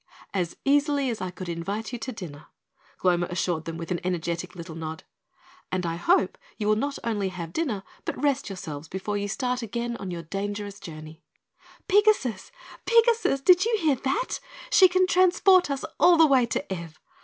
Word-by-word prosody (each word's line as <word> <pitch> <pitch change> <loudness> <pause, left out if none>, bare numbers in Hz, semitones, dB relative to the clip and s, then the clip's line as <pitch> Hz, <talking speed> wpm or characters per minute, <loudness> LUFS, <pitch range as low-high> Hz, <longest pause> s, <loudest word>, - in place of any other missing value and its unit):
"As 180 -4 -2
easily 285 -1 +2
as 225 - -5
I 185 - -2
could 180 0 -8
invite 200 +8 -4
you 245 - -3
to 255 - -4
dinner," 165 - -9 0.5
Gloma 175 -1 +2
assured 175 -2 -1
them 165 0 -5
with 165 +1 -6
an 175 - 0
energetic 175 0 -3
little 170 -1 -8
nod, 160 0 -6 0.7
"and 185 -1 -1
I 165 0 -2
hope 355 - +2 0.2
you 210 - -2
will 215 - +4
not 275 +6 -2
only 205 -4 -1
have 170 -3 -7
dinner 245 -12 -1 0.2
but - - -4
rest 280 -4 0
yourselves 160 -6 -7
before 195 +2 -4
you 205 0 -1
start 250 +4 -1
again 235 +1 -3
on 195 - -6
your 170 -2 -5
dangerous 200 +3 -4
journey." 155 -2 -10 0.7
"Pigasus 410 - +3 0.4
Pigasus, 460 - +3
did 365 0 +7
you 460 -1 +2
hear 315 -8 +2
that? 385 - -1 0.3
She 375 - +8
can 370 +1 +3
transport 370 0 +4
us 275 +1 -2
all 350 -1 +6
the 325 - +7
way 265 -5 +4
to 225 -4 -3
Ev! 170 -3 -8
205 Hz, 180 wpm, -26 LUFS, 175-285 Hz, 0.7 s, She